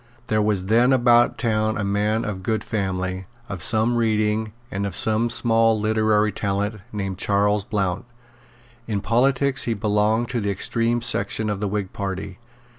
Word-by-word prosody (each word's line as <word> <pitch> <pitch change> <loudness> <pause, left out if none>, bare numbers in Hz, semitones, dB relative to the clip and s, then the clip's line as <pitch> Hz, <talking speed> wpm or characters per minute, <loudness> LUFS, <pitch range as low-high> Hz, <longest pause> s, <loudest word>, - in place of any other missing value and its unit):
There 110 0 +2
was 105 -3 0
then 120 +5 +3
about 120 -1 +4
town 110 -1 0
a 100 - -2
man 105 +3 0
of 100 -3 -5
good 110 +3 -2
family, 95 -2 -3 0.2
of 95 -6 -6
some 115 +1 +3
reading, 110 -1 0 0.2
and 100 +1 -2
of 95 - -4
some 110 +2 +3
small 115 -2 +2
literary 110 0 +1
talent, 100 +1 -2
named 95 -3 -4
Charles 105 +1 +1
Blount. 100 +1 -2 0.8
In 105 -3 -2
politics 130 +4 +1
he 115 - -1
belonged 105 +2 +1
to 120 -2 -2
the 100 - -2
extreme 115 +4 0
section 105 0 0
of 100 - -4
the 105 - -2
Whig 100 -1 -4
party. 95 0 -5
105 Hz, 160 wpm, -22 LUFS, 100-115 Hz, 0.8 s, about